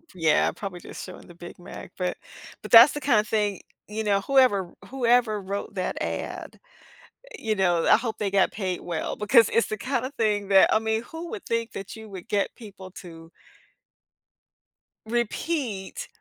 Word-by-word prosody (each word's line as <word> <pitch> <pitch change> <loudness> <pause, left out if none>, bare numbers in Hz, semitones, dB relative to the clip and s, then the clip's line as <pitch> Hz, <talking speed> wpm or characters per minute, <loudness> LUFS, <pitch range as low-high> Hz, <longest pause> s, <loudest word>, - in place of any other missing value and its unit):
Yeah, 160 -3 +2
probably 195 -3 -7
just - - -9
showing 185 - -12
the 175 - -14
Big 175 +1 -11
Mac, 175 - -10
but 180 -1 -2 0.4
but - - -10
that's 235 +4 +9
the 295 - -5
kinda 235 -6 +3
thing, 210 -2 0 0.3
y 210 - -11
you 220 - 0
know, 200 -1 +2
whoever 205 -7 +3
whoever 240 -4 +2
wrote 200 +1 -5
that 185 -1 -3
ad, - - -5 0.8
you 220 -2 -1
know, 175 -4 +2
I - - +6
hope 225 -2 -4
they 200 -2 -2
got 195 -1 +3
paid 185 -4 -3
well, 170 -3 -4
because 220 +1 +4
it's 230 - +2
the 215 - -4
kind 255 +2 -2
of 265 - -6
thing 210 -3 0
that 195 -1 +6
I - - +4
mean, 220 +1 -1
who 330 +4 -8
would 425 -4 -7
think 230 0 -2
that 195 +2 -7
you 220 -1 -11
would 190 -3 -9
get 200 -1 -1
people 195 -4 -12
to 165 -2 -12 1.8
repeat 240 - -3
210 Hz, 180 wpm, -25 LUFS, 190-235 Hz, 1.8 s, that's